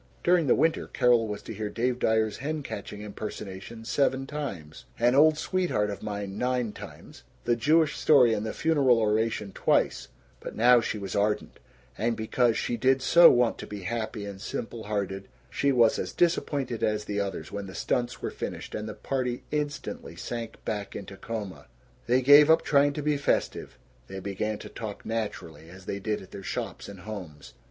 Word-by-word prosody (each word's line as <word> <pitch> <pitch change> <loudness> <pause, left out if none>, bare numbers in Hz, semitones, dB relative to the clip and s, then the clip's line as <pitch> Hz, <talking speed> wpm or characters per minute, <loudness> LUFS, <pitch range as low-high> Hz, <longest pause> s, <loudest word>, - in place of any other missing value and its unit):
During 175 -3 +3
the - - +5
winter 160 0 +1
Carol 120 -2 +3
was 105 -1 -5
to - - -7
hear 105 0 -4
Dave 125 +3 -1
Dyer's 110 -2 +1
hen 150 +2 -3
catching 105 -3 -7
impersonation 105 +1 -7
seven 135 +1 +1
times, 130 - -6
"An 120 +1 +3
Old 155 +3 +6
Sweetheart 160 - 0
of 100 - -7
Mine" 100 -1 -5
nine 125 -3 0
times, - - -11 0.2
the 120 - +2
Jewish 155 +5 +3
story 130 -7 +5
and 105 - -1
the 110 - -3
funeral 140 -7 +3
oration 110 -1 0
twice; - - +1 0.3
but - - -8
now 120 +2 +6
she 110 - -3
was 100 -2 -5
ardent 105 +1 0 0.4
and, 115 +1 0
because 115 +1 +1
she 120 - -1
did 130 +3 +2
so 170 +3 +8
want 120 -1 +2
to - - -7
be 105 -1 -7
happy 110 +2 -3
and 100 -1 -8
simple 115 +2 -5
hearted, 100 -2 -3 0.2
she 140 - +1
was 120 -4 +4
as - - -4
disappointed 145 -8 0
as 105 -1 0
the 105 0 -2
others 95 -6 -4
when 100 -1 -5
the 95 - -10
stunts 120 +8 -2
were - - -2
finished, - - -6
and 105 0 -4
the 105 - -7
party 125 -2 -2
instantly 150 -1 -4
sank 115 -2 -6
back 105 -2 -4
into 100 0 -7
coma. 105 -1 -6 0.4
They 125 +2 +3
gave 145 +3 +8
up 160 - +5
trying 145 0 +3
to 150 - -4
be 150 0 +1
festive; 140 - -1 0.3
they 95 0 -6
began 100 +2 -3
to - - -8
talk 105 -3 -7
naturally, 85 -8 -4
as 95 +1 -13
they 100 - -3
did 105 0 -2
at 95 - -16
their 100 - -8
shops 95 - -5
and 100 -3 -10
homes. 90 -8 -8
115 Hz, 185 wpm, -27 LUFS, 100-130 Hz, 0.4 s, so